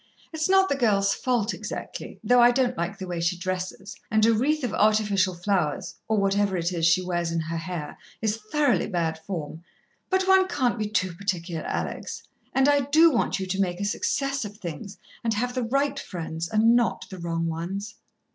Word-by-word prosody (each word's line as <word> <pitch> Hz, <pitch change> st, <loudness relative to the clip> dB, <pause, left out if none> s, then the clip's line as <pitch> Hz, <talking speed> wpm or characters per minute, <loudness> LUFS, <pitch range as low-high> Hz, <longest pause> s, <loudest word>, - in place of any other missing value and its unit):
It's 315 Hz, +2 st, -1 dB
not 385 Hz, 0 st, +5 dB
the -, -, +1 dB
girl's 200 Hz, -6 st, +2 dB
fault 240 Hz, -4 st, 0 dB
exactly, -, -, -7 dB
though 245 Hz, 0 st, +5 dB
I 240 Hz, -, +8 dB
don't 250 Hz, 0 st, +1 dB
like 170 Hz, +4 st, -3 dB
the 190 Hz, -, -6 dB
way 175 Hz, -2 st, -4 dB
she 170 Hz, +2 st, 0 dB
dresses, 185 Hz, +2 st, -4 dB
and 215 Hz, 0 st, +3 dB
a 230 Hz, -, +5 dB
wreath 285 Hz, +7 st, +1 dB
of 245 Hz, -, -2 dB
artificial 205 Hz, -3 st, +2 dB
flowers, 175 Hz, -4 st, -1 dB
or 220 Hz, -, +1 dB
whatever 200 Hz, -1 st, +1 dB
it 170 Hz, +1 st, -1 dB
is 165 Hz, -1 st, +2 dB
she 175 Hz, +2 st, +3 dB
wears 175 Hz, -2 st, -1 dB
in 165 Hz, -, 0 dB
her 165 Hz, +1 st, -4 dB
hair, 165 Hz, -2 st, -5 dB, 0.2 s
is 220 Hz, -1 st, 0 dB
thoroughly 290 Hz, -5 st, +2 dB
bad 165 Hz, -5 st, -1 dB
form. 160 Hz, -2 st, -6 dB, 0.5 s
But 375 Hz, 0 st, +1 dB
one 380 Hz, 0 st, +5 dB
can't 255 Hz, -9 st, 0 dB
be 215 Hz, -, -1 dB
too 185 Hz, -4 st, 0 dB
particular, 175 Hz, -3 st, -3 dB
Alex, -, -, -4 dB, 0.3 s
and 270 Hz, +1 st, +3 dB
I 290 Hz, 0 st, +5 dB
do 315 Hz, +5 st, +5 dB
want 235 Hz, -5 st, 0 dB
you 190 Hz, -, -2 dB
to 190 Hz, +1 st, -1 dB
make 175 Hz, -2 st, -1 dB
a 200 Hz, -, -1 dB
success 275 Hz, +6 st, -1 dB
of 210 Hz, -1 st, -8 dB
things, 175 Hz, +2 st, -7 dB, 0.3 s
and 225 Hz, -2 st, 0 dB
have 245 Hz, +3 st, -1 dB
the 255 Hz, -, -1 dB
right 275 Hz, +3 st, 0 dB
friends 165 Hz, -2 st, -5 dB
and 225 Hz, +2 st, +4 dB
not 240 Hz, -1 st, +1 dB
the 190 Hz, -, -7 dB
wrong 165 Hz, -1 st, -2 dB
ones." 185 Hz, +6 st, -4 dB
200 Hz, 200 wpm, -26 LUFS, 175-245 Hz, 0.5 s, I